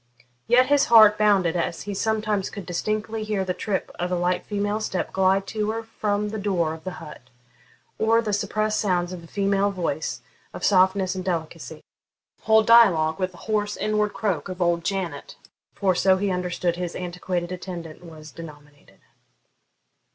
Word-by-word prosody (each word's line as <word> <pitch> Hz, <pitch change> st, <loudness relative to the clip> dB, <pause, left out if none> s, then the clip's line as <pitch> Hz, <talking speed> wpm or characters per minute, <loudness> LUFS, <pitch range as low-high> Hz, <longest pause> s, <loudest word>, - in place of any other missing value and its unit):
Yet 245 Hz, +2 st, +5 dB
his 285 Hz, +1 st, +3 dB
heart 215 Hz, -3 st, +7 dB
bounded 195 Hz, -5 st, +3 dB
as 170 Hz, -1 st, -2 dB
he 205 Hz, -, -5 dB
sometimes 215 Hz, -1 st, -1 dB
could 200 Hz, -3 st, -8 dB
distinctly 215 Hz, +5 st, -3 dB
hear 210 Hz, -3 st, -2 dB
the 185 Hz, -, -1 dB
trip 190 Hz, +1 st, -3 dB
of 180 Hz, +1 st, -2 dB
a -, -, +1 dB
light 175 Hz, +1 st, 0 dB
female 205 Hz, 0 st, -1 dB
step 190 Hz, -4 st, -3 dB
glide 190 Hz, +1 st, +2 dB
to 215 Hz, -1 st, -2 dB
or 225 Hz, +1 st, -4 dB
from 210 Hz, -2 st, -2 dB
the 215 Hz, +1 st, -5 dB
door 180 Hz, -6 st, 0 dB
of 160 Hz, 0 st, -11 dB
the 185 Hz, -, -4 dB
hut, 155 Hz, -4 st, -10 dB, 0.8 s
or 225 Hz, +1 st, +3 dB
the 215 Hz, -3 st, -2 dB
suppressed 215 Hz, +1 st, 0 dB
sounds 180 Hz, -3 st, 0 dB
of 175 Hz, -2 st, -8 dB
a -, -, -13 dB
female 200 Hz, +1 st, +1 dB
voice, 185 Hz, -4 st, -3 dB, 0.3 s
of -, -, -3 dB
softness 190 Hz, -1 st, +3 dB
and 185 Hz, -1 st, -5 dB
delicacy, 165 Hz, -3 st, -4 dB, 0.6 s
hold 220 Hz, 0 st, +4 dB
dialogue 185 Hz, -9 st, +5 dB
with 185 Hz, -1 st, 0 dB
the -, -, -14 dB
hoarse 210 Hz, -1 st, -1 dB
inward 210 Hz, -1 st, 0 dB
croak 195 Hz, -6 st, -2 dB
of 185 Hz, 0 st, -6 dB
old 170 Hz, -1 st, +1 dB
Janet, 175 Hz, -6 st, -4 dB, 0.4 s
for 195 Hz, -2 st, +1 dB
so 190 Hz, +1 st, +3 dB
he 195 Hz, 0 st, -1 dB
understood 180 Hz, -1 st, -1 dB
his 175 Hz, -1 st, -4 dB
antiquated 180 Hz, 0 st, -4 dB
attendant 175 Hz, -3 st, -7 dB
was 155 Hz, -3 st, -12 dB
denominated. 145 Hz, -3 st, -14 dB
190 Hz, 170 wpm, -24 LUFS, 175-210 Hz, 0.8 s, heart